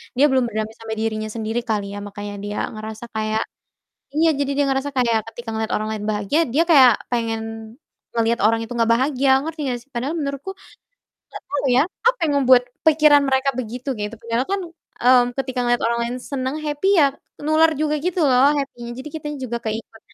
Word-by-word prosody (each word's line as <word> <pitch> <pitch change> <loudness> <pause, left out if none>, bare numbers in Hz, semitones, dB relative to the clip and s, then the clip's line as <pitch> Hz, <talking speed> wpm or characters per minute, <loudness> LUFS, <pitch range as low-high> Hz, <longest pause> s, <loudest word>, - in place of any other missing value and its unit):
dia 275 - +5
belum 260 -1 +3
berdamai 220 -1 -3
sama 225 -1 -5
dirinya 215 -1 -2
sendiri 225 +1 -2
kali 205 -2 -1
ya, - - -5
makanya 205 0 -7
dia 205 0 -4 0.2
ngerasa 220 +1 -7
kayak 215 0 0 0.7
iya, 325 +1 +4
jadi 280 -1 0
dia 285 - +4
ngerasa 270 +2 -1
kayak 235 -3 +2
ketika 240 0 -11
ngeliat 220 0 -2
orang 215 +1 -1
lain 210 -1 -4
bahagia, 210 +9 0
dia 325 - +5
kayak 260 -6 +8 0.2
pengen 230 -2 -1 0.7
ngelihat 230 0 +1
orang 225 +1 +2
itu 225 - -21
enggak 230 -1 +1
bahagia, 265 +2 +1 0.2
ngerti 320 -1 -5
enggak 245 - -2
sih? 265 - -30
Padahal 260 +7 -2
menurutku 280 +4 -4
enggak - - -19 0.9
tau - - -2
ya, 260 - +6 0.3
apa - - +1
yang 290 - +1
membuat 255 -1 +6 0.2
pikiran 300 -2 +6
mereka 265 +1 +2
begitu, 250 +2 -5
gitu. 210 +2 -3
Padahal 230 +2 -1
kan, 395 0 0 0.4
mmm, 250 -1 +7
ketika 260 -1 -3
ngeliat 240 0 +2
orang 235 +1 +1
lain 245 - -4 0.2
senang 265 +1 -2
happy 295 +5 -1
ya, 280 -5 +5 0.3
nular 315 +1 +4
juga 305 0 0
gitu 360 +2 -1
loh 265 0 +5
happy-nya, 240 -4 -4
jadi - - -6
kita 295 - -9
juga 255 -3 -4
keikut 220 0 -5
250 Hz, 190 wpm, -21 LUFS, 225-285 Hz, 0.9 s, kayak